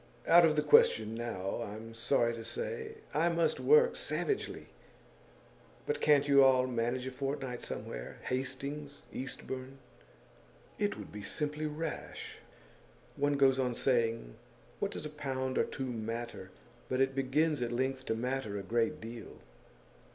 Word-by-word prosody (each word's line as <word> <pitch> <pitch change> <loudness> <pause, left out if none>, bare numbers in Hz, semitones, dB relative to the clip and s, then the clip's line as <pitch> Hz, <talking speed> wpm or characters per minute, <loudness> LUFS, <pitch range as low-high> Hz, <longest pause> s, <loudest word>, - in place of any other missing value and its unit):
'Out 170 +1 +8
of 155 -1 +3
the 150 - +2
question 110 -6 +5
now, 115 -5 -3
I'm 110 +2 -7
sorry 120 0 +2
to 115 -1 -6
say. 445 - -5 0.2
I 165 +3 +3
must 170 -1 +1
work 465 +2 +5
savagely. 470 -4 -2 1.2
But 450 0 -1
can't 145 -1 +5
you 140 -1 +7
all 130 -1 +5
manage 125 +1 -1
a 130 - -4
fortnight 135 -2 -3
somewhere - - -6
Hastings, 140 +3 -4
Eastbourne?' 130 0 -6 1.0
'It 205 -1 0
would - - -9
be 105 - -7
simply 150 +7 -2
rash. 155 +1 -5 0.8
One 145 0 +2
goes 135 -1 +4
on 125 -2 0
saying, 115 - +1 0.5
"What - - 0
does - - -6
a - - -3
pound 130 -3 -2
or - - +3
two 135 - -4
matter?" 115 -4 -4 0.4
but 130 - 0
it 135 0 +3
begins 145 +3 +1
at 120 -1 -1
length 130 +2 -1
to 110 - +1
matter 125 -3 -2
a 100 - -4
great 115 +3 0
deal. 115 +1 -8
130 Hz, 145 wpm, -32 LUFS, 115-150 Hz, 1.2 s, Out